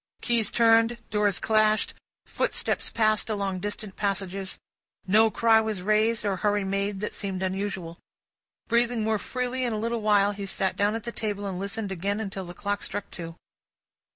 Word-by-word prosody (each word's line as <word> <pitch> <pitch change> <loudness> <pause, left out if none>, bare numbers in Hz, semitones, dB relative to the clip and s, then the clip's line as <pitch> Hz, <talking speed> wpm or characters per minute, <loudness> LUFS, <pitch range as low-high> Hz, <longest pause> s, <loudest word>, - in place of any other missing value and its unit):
Keys 235 -3 +2
turned, 230 0 +4
doors 210 -2 +2
clashed, 215 -1 +2 0.3
footsteps - - 0
passed 215 -1 +1
along 200 -3 -1
distant 205 0 -5
passages: 195 -1 -2 0.5
no 215 +4 +5
cry 225 0 +4
was 215 -4 -3
raised, 215 +2 +2
or 195 -2 0
hurry 205 +1 +1
made, 195 +1 -1
that 210 - -3
seemed 190 -2 -3
unusual. 190 -3 -3 0.7
Breathing 235 -1 +2
more 220 -1 +1
freely 255 +2 -2
in 240 -2 0
a - - -1
little 230 +1 -1
while, 205 -1 +4
he 200 -1 -6
sat 190 0 -1
down 205 +2 +1
at 225 - -4
the 235 - -4
table, 205 -3 -3
and 190 -2 -3
listened 200 +1 -4
again 200 +3 -2
until 195 -3 -4
the 175 0 -9
clock 205 +1 -2
struck 205 - -5
Two. 165 -2 -7
205 Hz, 170 wpm, -26 LUFS, 195-220 Hz, 0.7 s, no